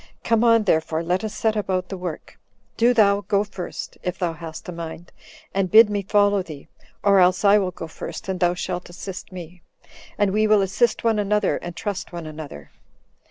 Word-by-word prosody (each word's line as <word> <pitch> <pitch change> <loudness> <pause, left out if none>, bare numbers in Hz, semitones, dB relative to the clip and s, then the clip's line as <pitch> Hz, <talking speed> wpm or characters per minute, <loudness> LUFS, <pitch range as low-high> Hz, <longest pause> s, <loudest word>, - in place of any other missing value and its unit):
Come 230 0 +2
on, 230 -2 +5
therefore, 160 -3 +1
let 180 +3 0
us 215 - -3
set 220 -1 0
about 185 -3 -1
the 195 - -4
work. 180 -4 -7 0.4
Do 235 +2 +4
thou 205 -4 +4
go 200 -1 +1
first, 200 -3 -7
if 180 0 -3
thou 175 -2 -1
hast 160 0 -9
a - - -4
mind, 170 0 -8 0.4
and 195 -1 0
bid 220 +2 +7
me 205 -1 0
follow 205 0 +3
thee; 155 -6 -10 0.4
or 200 -1 +5
else 185 +2 +3
I 205 +1 +6
will 190 -2 0
go 165 - -7
first, 160 - -8
and 190 -1 -2
thou 175 -1 +2
shalt 180 0 -4
assist 185 +2 -8
me, 180 -1 -10 0.6
and 205 -2 +2
we 215 +2 +2
will 210 -1 +5
assist 215 +4 +1
one 225 -2 +2
another, 210 0 +1
and 175 -1 -7
trust 200 0 -4
one 170 -2 -6
another. 150 - -9
190 Hz, 200 wpm, -23 LUFS, 175-210 Hz, 0.6 s, bid